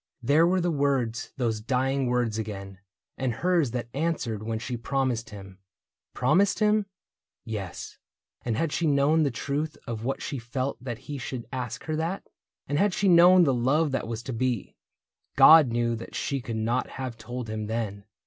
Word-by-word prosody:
There 150 +7 +4
were 185 +1 +2
the 175 0 +1
words, 130 -6 0
those 115 -4 -1
dying 130 +2 0
words 120 -3 0
again. 100 -3 -6 0.4
And 130 -3 0
hers 175 -4 +2
that 120 0 -4
answered 140 -8 -2
when 110 +1 -3
she 120 +2 -4
promised 120 -1 -1
him. 100 -2 -11 0.6
Promised 185 +11 +3
him?... 210 -1 +2 0.6
yes. 100 -6 -6 0.4
And 115 -2 -1
had 165 +2 0
she 165 +1 0
known 145 +2 +3
the 145 - +2
truth 145 +5 -3
Of 115 -2 -5
what 135 +3 -2
she 140 - -4
felt 125 +2 -4
that 120 -3 -4
he 145 -2 -5
should 125 0 -5
ask 125 -2 -4
her 155 - -2
that. 165 +5 -3 0.4
And 145 +1 0
had 200 -2 +2
she 200 - +1
known 180 +1 +7
the 140 -5 +3
love 140 +6 +2
that 135 - -2
was 115 0 -5
to 130 - -5
be, 120 -2 -2 0.6
God 160 -3 +9
knew 120 0 0
that 115 - -9
she 140 -1 -2
could 115 -2 -4
not 115 +3 0
have 130 -3 -4
told 125 0 -6
him 110 -1 -4
then. 105 -3 -3
125 Hz, 180 wpm, -27 LUFS, 115-150 Hz, 0.6 s, God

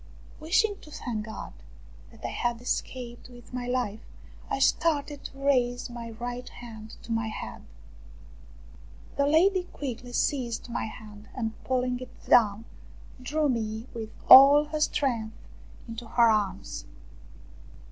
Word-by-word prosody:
Wishing 385 +6 +2
to - - -14
thank 225 -7 -4
God 220 - -7 0.6
that - - -12
I - - -2
had 240 -1 -1
escaped 245 0 -4
with 245 0 -15
my 245 -1 -3
life, 245 -4 -1 0.5
I - - 0
started 290 0 +1
to 270 - -8
raise 250 -3 +1
my 235 -1 -7
right 245 +2 -6
hand 220 -2 -10
to 230 - -8
my 225 0 0
head. 220 - -6 1.5
The 280 0 +2
lady 360 +5 +4
quickly 250 -7 -6
seized 240 -3 -1
my 235 - -2
hand 210 -1 -11
and 225 -3 -2
pulling 250 -1 0
it 255 - -12
down, 220 -2 +4 0.6
drew 300 +4 0
me 220 -3 -2
with 225 -2 -5 0.2
all 280 +3 +10
her 305 +1 -4
strength 240 -8 0 0.5
into 230 0 -7
her 235 0 +5
arms. 195 - -2
245 Hz, 135 wpm, -28 LUFS, 225-275 Hz, 1.5 s, all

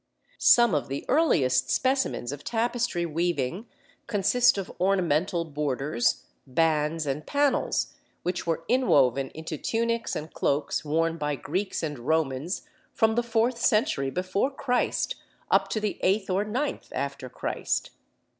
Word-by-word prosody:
Some 235 -5 +6
of 150 - 0
the 135 +1 -5
earliest 130 - +3
specimens 260 - 0
of 145 0 -7
tapestry 235 -6 0
weaving 170 - -1 0.4
consist 215 +4 +3
of 195 - -4
ornamental 175 -3 +1
borders, 140 -5 -1 0.2
bands, 155 +2 +1
and 140 +2 -2
panels, 285 - +1 0.3
which 180 0 -2
were 165 0 -1
inwoven 135 - +3
into 160 -1 -5
tunics 230 0 -1
and 155 +1 -6
cloaks 145 +1 0
worn 165 +2 0
by 150 -1 -1
Greeks 185 +9 -3
and 150 -4 -3
Romans 150 +4 -1 0.3
from 220 -1 +2
the 240 - +2
fourth 235 +1 0
century 210 - +2
before 185 - 0
Christ, 265 -3 -1 0.3
up - - +4
to 220 - -1
the 210 -1 -2
eighth 195 0 +1
or 190 +2 +2
ninth 250 +8 -3
after 140 -2 -4
Christ. - - -2
170 Hz, 135 wpm, -27 LUFS, 145-225 Hz, 0.4 s, Some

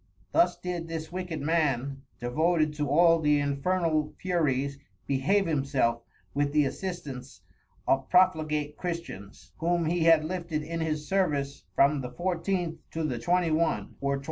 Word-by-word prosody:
Thus 340 - +3
did 175 -2 -4
this 165 -1 -5
Wicked 180 -4 -4
Man, 140 -4 0 0.2
devoted 155 +5 +1
to 150 -2 -2
all 165 +3 +5
the 150 -2 +3
Infernal 155 +2 0
Furies, 140 -6 0 0.3
behave 145 +10 +2
himself 135 -6 +1 0.3
with 145 0 0
the 150 -1 +4
Assistance 140 -6 -6 0.5
of 135 0 +1
Profligate 155 -4 +2
Christians, 165 - -6
whom 170 +1 +1
he 165 +1 +1
had 165 -2 +6
lifted 170 -3 -3
in 165 +2 -4
his 155 -2 -2
Service 145 -8 0
from 140 +1 +4
the 125 - -5
14th 175 +2 -2
to 160 - -3
the 130 -6 -2
21. 170 +1 +1
or 140 0 +1
22. - - -4
155 Hz, 145 wpm, -28 LUFS, 140-170 Hz, 0.5 s, had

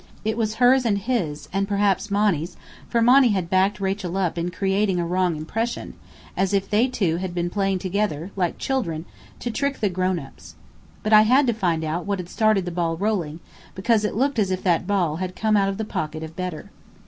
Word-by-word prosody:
It 220 0 0
was 220 -2 -1
hers 255 +2 +5
and 215 -4 +1
his, 195 -9 -2
and 195 0 0
perhaps 200 0 +1
Monny's, 195 -5 0 0.3
for 235 -1 +2
Monny 255 +2 +6
had 180 -4 -2
backed 190 +2 +2
Rachel 190 -2 -2
up 185 -4 0
in 170 +1 -2
creating 195 +1 0
a 170 - 0
wrong 180 0 +1
impression, 225 +10 -3 0.4
as 190 +1 +1
if 195 0 0
they 220 +5 +3
two 195 -10 0
had 180 -1 -4
been 175 0 -1
playing 195 -1 0
together, 185 -2 -2
like 180 -3 -1
children, 175 - -2 0.4
to 240 - -2
trick 280 +3 -1
the 210 - +1
grown 185 0 0
ups. 135 -5 -11 0.5
But 215 - +1
I 215 - +9
had 255 +6 +4
to 240 - +2
find 175 -7 0
out 165 +4 -3
what 200 -1 0
had 180 -1 -7
started 215 -4 +2
the 175 - -3
ball 165 -1 -1
rolling, 175 -6 -2 0.3
because 215 +3 +2
it 210 - -1
looked 270 +1 +1
as 200 -3 +2
if 185 -1 -2
that 175 -3 +1
ball 180 -6 +1
had 185 0 -4
come 215 +2 +1
out 195 -1 +3
of 195 - -3
the 220 - -3
pocket 160 -6 -4
of 160 0 -8
Bedr. 180 +1 -5
195 Hz, 215 wpm, -23 LUFS, 175-215 Hz, 0.5 s, I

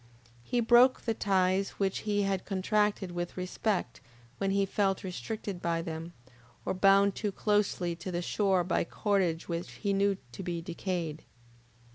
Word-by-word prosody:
He 240 - 0
broke 240 +3 +6
the 230 - -1
ties 195 -2 +1
which 195 -1 0
he 205 -1 +2
had 195 -1 0
contracted 205 0 0
with 175 +1 -4
respect 185 - -2 0.4
when 195 - 0
he 195 0 +2
felt 195 -1 0
restricted 195 0 -5
by 165 -1 0
them, 165 0 -6 0.5
or - - 0
bound 195 +1 +5
too 210 0 -2
closely 195 -4 0
to 185 +2 -6
the 175 0 -2
shore 190 -1 +2
by 180 - +1
cordage 180 -4 0
which 170 0 -3
he 200 -2 -1
knew 200 0 +2
to 120 - -7
be 175 -2 -3
decayed. 170 -2 -3
190 Hz, 155 wpm, -30 LUFS, 175-200 Hz, 0.5 s, broke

